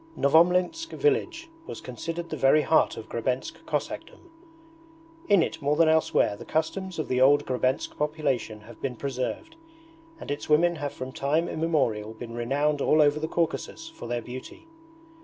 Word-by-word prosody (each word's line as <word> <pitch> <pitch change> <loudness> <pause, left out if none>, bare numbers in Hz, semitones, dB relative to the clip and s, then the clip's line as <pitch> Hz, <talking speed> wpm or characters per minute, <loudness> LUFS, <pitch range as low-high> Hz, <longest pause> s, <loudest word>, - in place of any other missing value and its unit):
Novomlinsk 180 - +3
village 350 -7 0 0.2
was - - -6
considered 165 +7 -6
the - - -1
very 145 +1 +4
heart 160 - +3
of 110 - -8
Grebensk 125 +2 -3
Cossackdom. 350 - -5 1.0
In 195 -5 +6
it - - -4
more 145 +1 +1
than 165 +1 +4
elsewhere 160 -9 +3
the - - -10
customs 180 +4 -2
of 155 - -2
the 125 0 0
old 145 +2 +5
Grebensk 130 +1 -1
population 140 -8 -1
have 110 +1 -14
been 130 -2 -3
preserved, 140 - -4 0.6
and - - -6
its 145 - -4
women 170 +3 +4
have 145 -2 -3
from 130 0 -7
time 150 +6 0
immemorial 130 -11 -1
been 115 +1 -8
renowned 140 +5 0
all 155 - +3
over 150 0 +4
the 160 - -2
Caucasus 170 - -2
for 325 - -10
their 120 0 -2
beauty. 130 - -9
150 Hz, 160 wpm, -26 LUFS, 130-165 Hz, 1.0 s, In